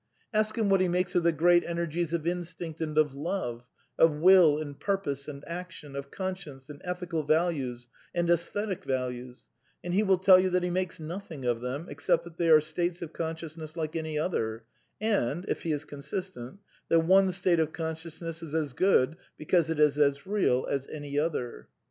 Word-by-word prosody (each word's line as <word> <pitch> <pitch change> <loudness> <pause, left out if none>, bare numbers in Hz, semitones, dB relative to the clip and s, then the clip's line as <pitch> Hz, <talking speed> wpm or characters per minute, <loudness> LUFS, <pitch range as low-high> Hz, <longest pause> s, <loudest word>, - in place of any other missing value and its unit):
Ask 215 +1 +1
him 220 -2 +2
what 195 -1 +5
he 185 - +3
makes 180 0 0
of 175 - +3
the 170 0 +3
great 175 +2 +4
enei^es 170 -1 -2
of 170 -2 -2
in 175 +1 0
stinct 165 -1 -7
and 155 -1 -3
of 150 -3 +3
love, 140 -6 -3 0.3
of 165 -2 +5
will 170 -2 +6
and 145 -2 -6
purpose 165 -9 -2
and 140 -1 -8
action, 170 -5 -7
of 140 0 -5
con 190 +2 -3
science 145 -6 -11
and 145 - -12
ethical 180 -2 -2
values 145 -6 0 0.3
and 175 0 +1
aesthetic 185 +3 0
values, 125 -1 -4 0.3
and 175 - -3
he 205 +3 +3
wiU 190 -3 +3
tell 185 0 +7
you 185 0 +2
that 180 0 +1
he 180 - -1
makes 185 -1 -2
nothing 160 -3 -7
of 120 -1 0
them 130 +6 -4
«^cept 170 -1 0
that 170 -1 -12
they 170 -1 +1
are 155 -1 +9
states 175 +3 -2
of 165 - -8
consciousness 160 -1 -5
like 155 -1 -3
any 160 -1 -2
other, 115 -9 -1 0.4
and 190 - 0
— - - -17
if - - -2
he 165 - -2
is 150 0 -2
consistent 145 0 -6
— - - -34
that 165 - +5
one 190 +3 +5
state 180 -2 +2
of 160 -1 +1
consciousness 160 0 -5
is 160 -2 -6
as 150 -5 -1
good, 160 -2 +3 0.2
because 165 +1 +2
it 160 -2 -1
is 150 -1 +4
as 140 -1 +2
real 190 -11 +1
as 140 -1 -2
any 145 -1 -3
other. 125 - -3
165 Hz, 205 wpm, -29 LUFS, 145-180 Hz, 0.4 s, are